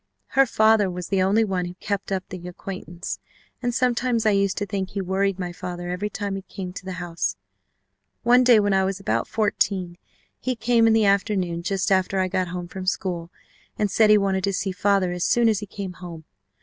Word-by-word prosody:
Her 270 0 +4
father 220 -3 +4
was 180 -1 -6
the 195 -1 +2
only 200 +4 +3
one 190 -4 -1
who 175 0 -7
kept 200 +1 -4
up 190 -1 -2
the 180 -1 -8
acquaintance, 180 -1 -6 0.4
and 245 -1 0
sometimes 240 -1 +1
I 215 - +5
used 200 -1 +1
to 205 - -1
think 195 -2 -3
he 200 - -4
worried 190 +1 0
my 180 -2 -4
father 175 0 -6
every 185 +4 -2
time 200 -1 -3
he 195 - -4
came 185 -1 -7
to - - -8
the 190 - -4
house. 170 - -3 0.9
One 245 +1 +6
day 245 -3 +7
when 205 -1 +2
I 190 0 +3
was 190 0 -2
about 195 - -1
fourteen 195 -4 0 0.4
he 255 0 -2
came 230 0 +3
in 225 - +5
the 220 -1 +4
afternoon 195 -4 +1
just 190 +2 -1
after 190 0 +2
I 185 0 +1
got 185 0 0
home 175 0 -5
from 185 +1 -7
school 175 -3 -2 0.5
and 210 -2 0
said 215 +2 +4
he 210 - +7
wanted 195 -2 0
to 200 - -1
see 190 +1 -1
father 195 -1 +1
as 175 0 -2
soon 240 -1 +3
as 215 -3 +2
he 205 - -7
came 195 -2 -6
home. 170 -3 -9
195 Hz, 215 wpm, -24 LUFS, 180-210 Hz, 0.9 s, day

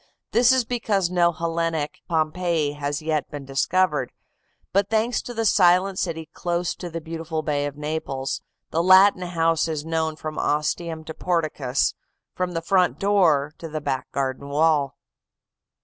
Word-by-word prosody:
This 240 +2 +5
is 260 -2 +3
because 210 -7 0
no 175 -1 +3
Hellenic 165 -2 -2
Pompeii 160 -1 0
has 145 +1 -3
yet 155 -2 -1
been 145 -2 -7
discovered, 175 +7 +1 0.6
but 200 0 +2
thanks 225 +2 +1
to - - -8
the 225 -1 -2
silent 185 -1 +4
city 160 -3 -3
close 175 0 -1
to 175 - -7
the 165 0 -5
beautiful 160 -1 -4
Bay 145 -1 0
of 145 0 -8
Naples, 150 -3 -3 0.3
the 165 - +1
Latin 185 +1 +6
house 165 -2 +1
is 155 -2 -3
known 160 -1 -1
from 155 0 -5
ostium 160 +2 -1
to 160 - -7
porticus, 155 -7 0 0.4
from 180 -1 -2
the 165 -1 -3
front 185 0 +2
door 165 -8 +2
to 165 - -7
the 155 0 -3
back 130 -3 -3
garden 135 +1 -3
wall. 150 -1 +2
165 Hz, 155 wpm, -24 LUFS, 150-180 Hz, 0.6 s, Latin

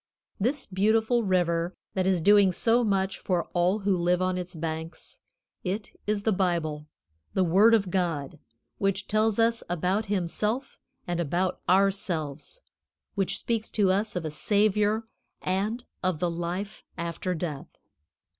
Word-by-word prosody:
This 260 +8 0
beautiful 220 +5 +2
river 175 -2 +1 0.2
that 185 -1 0
is 185 -3 +2
doing 200 +1 +6
so 230 +6 +2
much 195 -3 0
for 180 -3 0
all 180 +4 +2
who 195 -1 +2
live 175 0 +2
on 185 0 0
its 180 0 -5
banks, 160 +1 -5 0.4
it 200 +3 -3 0.2
is 210 -1 0
the 220 - +2
Bible, 170 -6 -1 0.5
the 190 - +3
Word 200 +7 +6
of 195 -5 0
God, 165 -7 -1 0.4
which 195 -1 0
tells 215 0 +2
us 230 0 +3
about 185 +5 0
Himself 210 +6 -1 0.3
and 175 -1 -2
about 175 +3 -1
ourselves, 185 - 0 0.5
which 195 -2 0
speaks 225 -2 -1
to 200 -3 +2
us 205 +2 0
of 175 -2 -2
a 155 - -3
Savior 210 +5 +2 0.4
and 210 +6 -1 0.2
of 185 -3 0
the 175 +2 0
life 175 +5 -4
after 170 +2 -3
death. 155 -4 -4
190 Hz, 145 wpm, -27 LUFS, 175-210 Hz, 0.5 s, doing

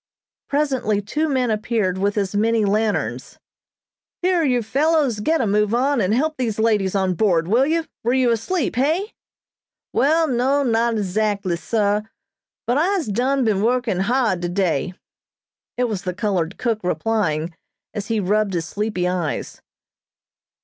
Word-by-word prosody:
Presently 265 -8 0
two 300 +10 -2
men 255 -4 +1
appeared 215 -4 -1
with 200 +2 0
as 195 -2 -1
many 220 +1 +2
lanterns. 210 +1 -1 0.9
"Here, 360 -1 +3
you 250 -5 +1
fellows, 280 0 +1
get 315 +8 +1
a - - +1
move 210 +1 +1
on, 270 +1 +2
and 185 0 +1
help 305 +7 0
these 235 -5 -2
ladies 210 -4 +1
on 190 -1 +1
board, 170 -3 +1
will 240 +8 +3
you? 325 +1 0 0.2
Were 240 +2 +1
you 255 -2 +3
asleep, 240 - -1
hey?" 325 - 0 0.8
"Wall, 320 +4 +3
no, 265 +2 +1
not 230 -1 +1
'zactly, 200 -2 -1
sah, 205 +3 0 0.6
but 245 +4 +1
I'se 360 - 0
done 255 +5 +1
been 205 -3 +1
working 235 -4 +1
hard 225 -3 +1
today," 175 -1 -1 0.8
it 250 - +1
was 215 -6 -2
the 180 -2 -4
colored 190 -4 -1
cook 230 -3 -1
replying, 175 -3 -1 0.4
as 205 -2 -5
he 225 -1 0
rubbed 205 0 +1
his 165 -2 -1
sleepy 200 -1 -2
eyes. 180 -4 -3
220 Hz, 150 wpm, -21 LUFS, 195-255 Hz, 0.9 s, Here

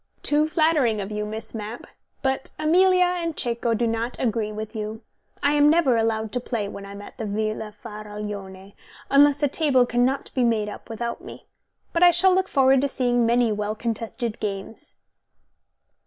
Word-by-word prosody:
"Too 300 +1 +2
flattering 310 -9 +2
of 200 +1 -5
you, 210 0 -3
Miss 220 +1 -7
Mapp. 220 +1 -6 0.4
But 265 0 -1
Amelia 365 +4 +4
and 345 -3 -2
Cecco 235 -1 0
do 235 +2 0
not 230 +2 -2
agree 225 -3 -1
with 215 +2 -7
you. 215 +1 -5 0.4
I 285 - +4
am 295 0 +5
never 305 -6 +4
allowed 220 -1 0
to 250 - -1
play 230 -4 -3
when 200 0 -8
I 200 - -9
am 200 0 -9
at - - -13
the 225 - -3
Villa 215 +1 -3
Faraglione, 210 -3 -8 0.4
unless 285 +1 +5
a - - +5
table 275 -3 +3
cannot 245 +3 0
be 255 - +1
made 220 -3 +1
up - - -10
without 235 +1 -4
me. - - -11 0.5
But 335 - 0
I 355 - +9
shall 360 +2 +5
look 375 0 +1
forward 270 -3 +4
to 280 - +1
seeing 245 -3 +1
many 235 -1 +3
well 210 0 -2
contested 230 0 -4
games." 200 +1 -6
235 Hz, 180 wpm, -24 LUFS, 215-280 Hz, 0.5 s, I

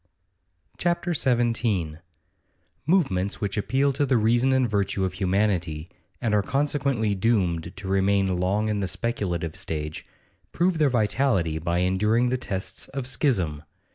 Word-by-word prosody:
CHAPTER 175 0 0
XVII 115 - 0 0.9
Movements 100 - +1
which 100 -2 -2
appeal 135 +6 +1
to 145 +2 0
the 130 -3 +3
reason 120 +4 +3
and 130 -1 +3
virtue 100 -2 0
of 95 - -3
humanity, 90 -4 -1 0.3
and 110 -3 -1
are 105 - +4
consequently 135 -3 0
doomed 95 -5 0
to 95 0 -7
remain 95 -1 +2
long 100 +4 +1
in 105 -1 0
the 95 - -1
speculative 90 -8 -2
stage, 80 -5 -4 0.5
prove 175 -1 +1
their 150 -2 +4
vitality 110 - +1
by 85 +2 0
enduring 105 +7 +2
the 130 - 0
tests 95 -6 -4
of 135 -1 -5
schism. 100 - 0
105 Hz, 140 wpm, -25 LUFS, 95-125 Hz, 0.9 s, are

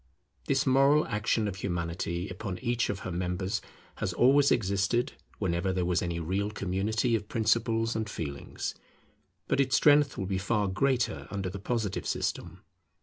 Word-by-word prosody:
This 135 -1 +2
moral 135 +3 +5
action 105 +1 0
of 100 -2 -4
Humanity 85 0 -2
upon 95 0 -5
each 120 0 0
of 100 -1 -3
her 90 - -5
members 90 +4 -2 0.4
has - - -2
always 140 +3 +5
existed 100 +3 +1 0.2
whenever 90 -1 0
there 90 -1 0
was 90 0 +1
any 85 -1 -2
real 95 +5 -1
community 105 +4 0
of 105 -2 -4
principles 115 +1 +1
and 110 -1 -2
feelings. 70 -7 -5 0.7
But - - +1
its 135 -1 +3
strength 145 -1 +5
will 95 - -2
be 95 0 -1
far 105 +1 0
greater 125 +5 0
under 95 -2 -3
the 100 - -6
Positive 110 -1 -2
system. 90 +3 -3
100 Hz, 155 wpm, -29 LUFS, 90-120 Hz, 0.7 s, moral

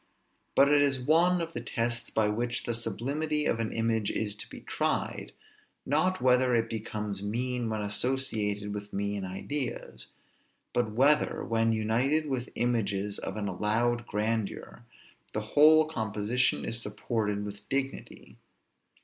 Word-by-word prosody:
But 140 - +6
it 145 - +5
is 140 -2 +2
one 170 +7 +3
of 165 0 -4
the - - -4
tests 120 0 -2
by 110 -1 +2
which 120 +3 -1
the 120 - -2
sublimity 140 +7 -1
of 115 - +1
an 115 -1 -1
image 115 -2 0
is 105 -2 -1
to 105 - -9
be - - -10
tried, - - -2 0.5
not 180 +7 +1
whether 125 -1 +4
it 115 0 0
becomes 105 -2 -4
mean 120 +3 -1
when 110 -1 -2
associated 105 -3 0
with 105 0 -6
mean 100 0 -2
ideas; 120 +7 -4 0.7
but 120 -2 +1
whether, 140 +7 +3
when 115 0 +2
united 120 +8 +1
with 130 -3 -2
images 105 -4 0
of - - -5
an 105 -1 -2
allowed 115 +5 0
grandeur, 110 +2 -2 0.5
the 105 - -1
whole 155 +1 +7
composition 110 -3 0
is 115 +1 -3
supported 105 -1 -2
with 100 0 -7
dignity. 135 0 -4
115 Hz, 140 wpm, -29 LUFS, 105-130 Hz, 0.7 s, whole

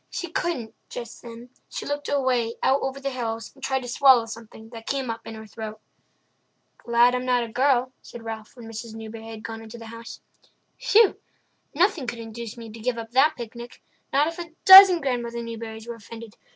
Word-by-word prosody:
She 350 -3 -5
couldn't, 310 -11 -2 0.2
just 235 -2 -8
then; 235 +1 -11 0.2
she - - -6
looked 290 0 -3
away 255 -5 +1
out 270 +1 +3
over 270 +1 -3
the 275 0 -3
hills 230 -3 -4
and 270 - -19
tried 265 -1 0
to - - -7
swallow 255 -1 +5
something 225 -1 -10
that 225 -1 -11
came 270 -4 -1
up 225 0 -8
in 225 - -7
her 220 0 -9
throat. 215 0 -8 1.0
"Glad 235 +1 +4
I'm 250 0 -1
not 250 -1 +2
a - - -5
girl," 255 +1 +2
said 235 - -11
Ralph, 220 -1 -7
when 240 -2 -11
Mrs. 225 0 -8
Newbury 225 0 -8
had 220 -1 -9
gone 225 -1 -6
into 225 +1 -10
the 230 - -10
house. 230 0 -9 0.6
"Whew! 430 -1 +4 0.6
Nothing 340 -5 +2
could 235 - -4
induce 230 0 -8
me 230 -2 -9
to 225 - -11
give 240 +2 -1
up 225 0 -7
that 285 +5 +4
picnic—not 240 +4 -4
if 330 +2 -5
a 335 -2 -7
dozen 380 -2 +11
Grandmother 235 -3 -2
Newburys 225 -1 -7
were 235 - -4
offended. 230 0 -11
235 Hz, 195 wpm, -25 LUFS, 225-265 Hz, 1.0 s, dozen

